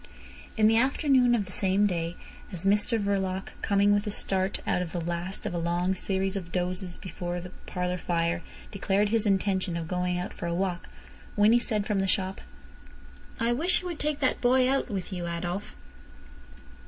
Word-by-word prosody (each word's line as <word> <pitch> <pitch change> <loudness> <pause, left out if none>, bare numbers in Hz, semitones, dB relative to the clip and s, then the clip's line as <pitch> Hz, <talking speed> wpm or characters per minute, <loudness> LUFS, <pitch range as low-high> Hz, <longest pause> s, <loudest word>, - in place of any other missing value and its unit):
In 215 - +4
the 225 +1 +5
afternoon 260 -1 +4
of 210 -4 0
the 185 - -10
same 195 +2 +2
day, 170 -3 -1 0.4
as 180 -1 -3
Mr 210 +3 +3
Verloc, 195 -2 -1
coming 200 0 +3
with 205 +1 +1
a - - +1
start 190 -1 0
out - - +1
of 170 -3 -5
the 175 - -1
last 170 +3 -3
of - - -2
a 170 - -1
long 175 +2 +1
series 190 +1 -1
of 180 -3 -5
dozes 180 0 -2
before 175 -1 -5
the 180 +1 -8 0.2
parlour 180 0 -2
fire, 170 0 0 0.3
declared 200 0 +1
his 225 0 +1
intention 190 -3 +1
of 165 -1 -4
going 180 0 -1
out 180 +1 -4
for 170 - -5
a 170 - -1
walk, 180 -1 -2 0.5
Winnie 220 +4 +5
said 215 -4 -1
from 210 -2 0
the 195 - +1
shop: 190 0 -1 1.0
"I 235 +1 +2
wish 340 +9 +2
you 360 - -4
would 340 - -5
take 300 -1 0
that 260 - +1
boy 255 +1 +4
out 270 +1 +1
with 195 -1 -4
you, 175 -1 -3
Adolf." 175 +3 -4
190 Hz, 190 wpm, -28 LUFS, 180-210 Hz, 1.0 s, the